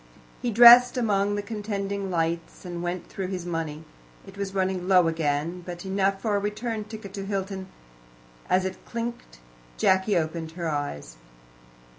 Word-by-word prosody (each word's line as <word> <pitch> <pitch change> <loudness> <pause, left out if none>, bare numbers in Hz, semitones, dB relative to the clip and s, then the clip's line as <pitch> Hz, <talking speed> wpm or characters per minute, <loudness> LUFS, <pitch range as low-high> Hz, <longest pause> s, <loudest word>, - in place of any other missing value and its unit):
He 245 - -1
dressed 240 +2 +9
among 205 -3 +1
the 205 - -3
contending 200 -2 -3
lights, 165 0 -2
and 175 -1 -5
went 175 +1 -4
through 190 -2 -5
his 180 -2 -4
money. 160 -3 -4 0.4
It 195 - -13
was 200 -1 -5
running 185 -1 -1
low 180 -3 +5
again, 165 +2 -1
but 175 +1 -7
enough 195 0 0
for 215 -3 +1
a - - +2
return 215 +2 -3
ticket 215 -3 -9
to 200 -1 -5
Hilton. 195 -1 -3 0.8
As 185 +1 +3
it 190 0 -5
clinked 235 - -6 0.4
Jacky 190 - +3
opened 160 0 -3
her 170 -1 -4
eyes. 145 - -4
190 Hz, 155 wpm, -26 LUFS, 170-205 Hz, 0.8 s, dressed